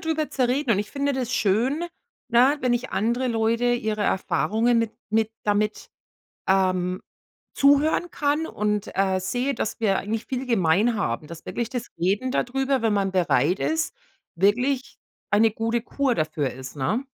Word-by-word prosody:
drüber 310 -1 0
zu 255 -2 +1
reden 260 0 0
und 200 - +3
ich 210 - -3
finde 280 0 -1
das 255 -1 -2
schön, 245 - +1 0.4
ne, 255 +5 +4
wenn 250 -1 +2
ich 245 +2 -3
andere 235 +5 0
Leute 230 +1 +1
ihre 215 -3 -1
Erfahrungen 225 +4 +1
mit 230 -1 -1 0.2
mit 220 0 +1
damit, 210 +1 0 0.6
ähm, 185 -1 +1 0.5
zuhören 285 +5 +3
kann 295 +2 0
und, 210 -4 -2
äh, 190 -1 +2
sehe, 250 +8 -1
dass 225 - -3
wir 195 -4 +2
eigentlich 220 +2 -3
viel 260 0 -3
gemein 210 +1 +2
haben. 135 - -2
Dass 170 +1 -10
wirklich 235 -2 -3
das 245 -2 -4
Reden 205 +9 0
darüber, 270 0 0
wenn 225 -2 +2
man 195 -1 +1
bereit 180 -2 +2
ist, 320 +6 -1 0.4
wirklich 250 +8 +1 0.3
eine 220 +2 +4
gute 230 +2 -1
Kur 270 0 0
dafür 155 - -1
ist, 130 +3 -9
ne? 215 - -1
225 Hz, 160 wpm, -24 LUFS, 195-255 Hz, 0.6 s, ne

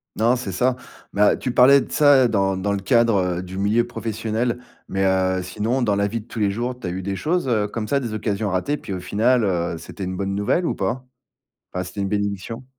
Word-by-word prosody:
Non, 115 +3 +3
c'est 120 -6 -4
ça 125 +7 +1 0.4
ben, 105 +1 +4
tu 130 - -3
parlais 135 +3 +7
de - - -8
ça 140 -4 +5
dans 95 -4 +1
dans 100 +2 -1
le 100 - -1
cadre, 115 +1 +3 0.2
heu, - - -5
du 90 +1 -8
milieu 105 +4 +2
professionnel 115 +1 -2 0.3
mais, 95 0 0
heu, 95 -1 +1
sinon, 110 +8 -1
dans 105 -4 +2
la 100 0 +1
vie 115 +2 -3
de - - -18
tous 115 - -7
les 105 -2 +2
jours, 120 +4 -3
tu 95 - -5
as - - -1
eu 90 +2 -4
des 100 +1 -3
choses, 160 - -1
heu, 110 -4 +1
comme 105 0 -4
ça, 140 - +1
des 120 -4 -4
occasions 105 -1 -1
ratées 95 +11 -1
puis 100 - -7
au 95 - -3
final, 115 +6 +2
heu, 85 -4 -1
c'était 90 +4 -7
une 95 0 -4
bonne 95 0 -2
nouvelle 105 - +1
ou - - 0
pas? 120 +7 -2 0.7
Enfin, 90 - -2
c'était 90 +2 -6
une 100 - 0
bénédiction? 100 +4 -3
105 Hz, 240 wpm, -22 LUFS, 95-120 Hz, 0.7 s, parlais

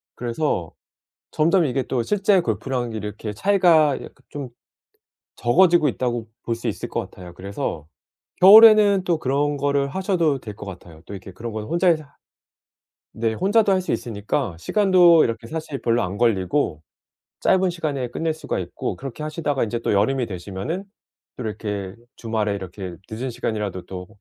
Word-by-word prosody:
그래서 120 - -2 0.6
점점 165 +3 +3
이게 135 -1 0
또 125 -3 -1
실제 200 - +2
골프랑 125 -7 -2
이렇게 105 0 -5
차이가 165 - +4
약간 - - -10 0.2
좀 140 -3 -6 0.9
적어지고 170 +4 +4
있다고 120 -3 -2 0.2
볼 115 - -1
수 115 - -7
있을 - - -4
것 - - -2
같아요. 90 -1 -11
그래서 90 -5 -5 0.6
겨울에는 210 -1 +8
또 170 -2 +1
그런 145 +2 0
거를 140 0 +1
하셔도 170 -3 0
될 105 -4 -8
것 100 - -9
같아요. 85 -4 -11
또 - - -9
이렇게 95 0 -9
그런 115 +5 -7
건 110 -1 -4
혼자 175 - 0
해사 155 -4 +1 1.0
네 115 0 -1
혼자도 205 - +2
할 185 - +1
수 - - -4
있으니까 110 - -2
시간도 180 - +5
이렇게 115 0 -4
사실 155 -2 -5
별로 120 0 +1
안 95 +2 -4
걸리고 95 - +1 0.6
짧은 190 0 +3
시간에 145 -7 -3
끝낼 160 +5 -2
수가 155 - -4
있고 90 - -5
그렇게 135 +2 -7
하시다가 150 -3 -1
인제 115 +1 -3
또 - - -1
여름이 120 +6 +2
되시면은 100 - -5 0.5
또 - - -6
이렇게 105 -3 -4 0.2
주말에 110 -3 -2
이렇게 95 -1 -7
늦은 120 +4 -4
시간이라도 105 -6 -3
또 90 -1 -7
125 Hz, 340 characters per minute, -22 LUFS, 105-165 Hz, 1.0 s, 겨울에는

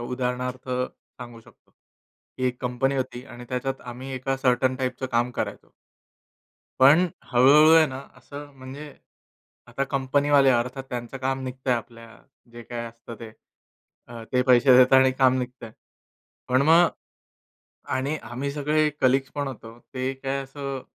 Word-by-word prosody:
उदाहरणार्थ 125 +1 -4
सांगू 125 -2 -6
शकतो. - - -23 0.7
ही 130 - 0
एक 125 0 -3
कंपनी 130 +2 0
होती 125 -1 -4
आणि 120 +1 -11
त्याच्यात 135 +1 -3
आम्ही 125 +2 -8
एका 135 +1 -2
सर्टन 130 0 +1
टाइपचं 130 0 -3
काम 120 0 0
करायचो. - - -5 1.1
पण 155 +7 +6 0.3
हळू-हळू 145 +6 +6
आहे 160 -1 +6
ना 130 -1 -7 0.2
असं 145 0 -10
म्हणजे, 140 +3 -10 0.7
आता 130 +3 -3
कंपनीवाले 140 +1 +2
अर्थात 125 +2 -1
त्यांचं 120 +2 -6
काम 135 0 -2
निघतंय 130 0 -2
आपल्या 115 0 -8 0.4
जे 120 0 -10
काय 120 0 -6
असतं 115 0 -11
ते. 115 - -8 0.8
अ, 115 -1 -9
ते 125 0 +3
पैसे 125 0 +6
देतात 130 +1 +6
आणि 130 0 +4
काम 130 -1 +3
निघतंय. 125 -2 -6 0.8
पण 130 +2 +3
मग 165 +4 +6 1.1
आणि 140 +4 -1
आम्ही 130 +4 -4
सगळे 150 +1 +1
कलीग्ज 135 +1 +2
पण 145 -1 -2
होतो. 115 -3 -10
ते 130 +2 -4
काय 135 +1 -3
असं 135 -1 -6
130 Hz, 145 wpm, -24 LUFS, 125-135 Hz, 1.1 s, पण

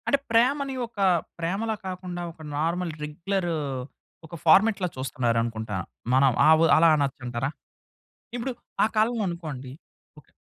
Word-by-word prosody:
అంటే 280 - +4
ప్రేమని 265 +4 +2
ఒక 225 -3 -14 0.4
ప్రేమలా 200 +7 -1
కాకుండా, 180 -1 -5
ఒక 165 - -17 0.2
నార్మల్ 170 +2 -1
రెగ్యులర్ 175 +5 -2 0.8
ఒక 160 - -9
ఫార్మాట్‌లా 195 +3 +5
చూస్తున్నారనుకుంటా. 115 -5 -1 0.4
మనం 135 0 +5 0.2
ఆ - - +7
వ్ - - +4
అలా 165 +1 +6
అనచ్చంటారా? 130 -3 -2 0.9
ఇప్పుడు 245 +2 -2 0.3
ఆ - - +6
కాలంలో 225 +1 +2
అనుకోండి 150 -7 -6 0.5
ఓకే - - -25
170 Hz, 120 wpm, -26 LUFS, 135-205 Hz, 0.9 s, ఆ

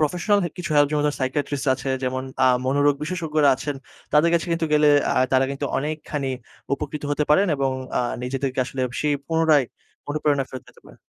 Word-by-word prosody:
Professional 180 +7 +2
হে - - -1
কিছু 170 -2 -5
help 145 -1 +5
যেমন 150 -1 +1
ধরেন 145 - -1
সাইকিয়াট্রিস্ট 140 +2 -2
আছে, 135 +1 -4
যেমন 130 0 -2 0.2
আ - - +6 0.2
মনোরোগ 145 +2 +3
বিশেষজ্ঞরা 155 -3 +1
আছেন 145 +2 -4 0.4
তাদের 150 +3 +4
কাছে 170 - +1
কিন্তু 165 -1 0
গেলে 150 0 +5 0.2
আ - - -1 0.2
তারা 130 0 +4
কিন্তু 140 +1 -3
অনেকখানি 150 -1 -3 0.4
উপকৃত 150 +1 -6
হতে 150 +1 +1
পারেন 195 +7 +5
এবং 135 -1 0 0.3
আ - - +2 0.2
নিজেদেরকে 130 +1 -2
আসলে 130 +1 -6 0.2
সেই 150 -1 +1
পুনরায় 160 -4 +3 0.4
অনুপ্রেরণা 145 -2 0
ফেরত 130 - -8
দিতে - - -19
পারেন। - - -16
145 Hz, 185 wpm, -23 LUFS, 135-155 Hz, 0.4 s, আ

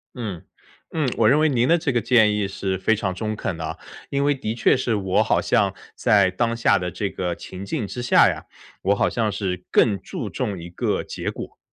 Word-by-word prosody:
嗯， 105 -9 -5 0.5
嗯， 155 -5 +1
我 110 -2 +5
认 145 +4 +4
为 155 - +4
您 125 -4 +2
的 170 - +5
这 155 -4 -1
个 120 - +2
建 110 -2 +4
议 105 -1 0
是 95 -1 -3
非 110 +4 +2
常 100 -3 -2
中 110 +2 -3
肯 95 -5 -3
的。 80 -1 -5 0.3
因 140 0 0
为 145 0 +3
的 110 -5 -3
确 115 - +3
是 125 -3 0
我 95 -2 +1
好 - - +2
像 - - +2 0.2
在 100 -3 +4
当 115 +5 -1
下 115 - +3
的 90 -1 -3
这 100 +4 -2
个 90 -2 -3
情 95 +3 -9
景 115 -2 -3
之 125 - -5
下 120 - +5
呀， - - -4 0.4
我 100 +2 +2
好 - - +2
像 110 -3 0
是 95 -3 -3
更 105 -4 +3
注 - - -5
重 100 -3 -3
一 85 - -8
个 85 - -1
结 - - -4
果。 - - -9
105 Hz, 240 characters per minute, -23 LUFS, 95-120 Hz, 0.5 s, 我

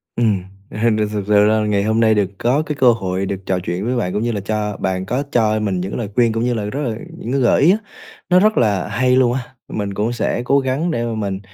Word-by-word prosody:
Ừm, 105 -6 +1 0.3
thì - - -8 0.3
thực 105 -2 -2
sự 105 0 +5
là 110 0 +2
ngày 100 -1 +1
hôm 110 +1 +1
nay 110 -1 +4
được 100 -3 +1
có 130 +6 +1
cái 150 - -3
cơ 130 -3 +5
hội 95 -3 -2
được 95 0 -5
trò 95 -1 0
chuyện 90 +4 -3
với 125 +1 0
bạn 90 -7 -1
cũng 105 - -1
như 120 - 0
là 105 - -3
cho 105 0 -2
bạn 95 0 -2
có 125 +8 -1
cho 110 -2 +2
mình 100 -4 -1
những 95 - -4
cái - - -4
lời 110 -4 -4
khuyên, 120 -2 +3
cũng 115 +1 -1
như 125 - +1
là 110 -3 -2
rất 135 +8 -3
là 115 -6 -2 0.2
những 120 - -6
cái 135 - +1
gợi 120 - +3
ý 165 +5 +6
á, 205 - +3 0.5
nó 180 - +6
rất 215 +3 +3
là 105 -5 +1
hay 125 +5 +1
luôn 125 -2 +3
á. 130 - -1 0.3
Mình 100 -2 -4
cũng 105 +4 -1
sẽ 120 - -1
cố 140 +2 +3
gắng 135 +6 -1
để 120 -7 -1
mà 115 - -3
mình 100 -3 -3
110 Hz, 280 wpm, -19 LUFS, 100-125 Hz, 0.5 s, ý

